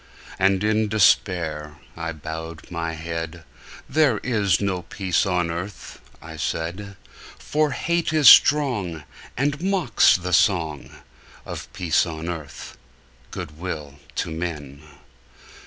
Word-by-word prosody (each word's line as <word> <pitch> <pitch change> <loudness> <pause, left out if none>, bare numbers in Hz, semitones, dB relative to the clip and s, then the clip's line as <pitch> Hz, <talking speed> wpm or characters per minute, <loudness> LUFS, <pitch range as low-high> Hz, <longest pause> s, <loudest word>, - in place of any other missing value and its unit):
And 95 +1 +2
in 110 0 +2
despair 85 -7 +1 0.2
I 80 0 -4
bowed 80 +1 -8
my 85 -1 -3
head; 80 +1 -5 0.4
"There 150 -8 +3
is 105 -8 +1
no 95 -3 -1
peace 95 +1 -1
on 90 -2 0
earth," 90 +5 -7 0.2
I 80 0 -9
said: 85 +6 -4 0.4
"For 155 0 0
hate 170 +4 -1
is 155 -3 +4
strong, 105 - +5 0.3
And 140 +3 0
mocks 185 - +3
the 90 0 -4
song 80 -5 +2 0.6
Of - - -7
peace 85 -2 +1
on 80 +1 -5
earth, 80 -4 -8 0.5
good 75 +1 -8
will 75 -6 -6 0.2
to - - -2
men!" 75 -4 -5
90 Hz, 120 wpm, -23 LUFS, 80-105 Hz, 0.6 s, strong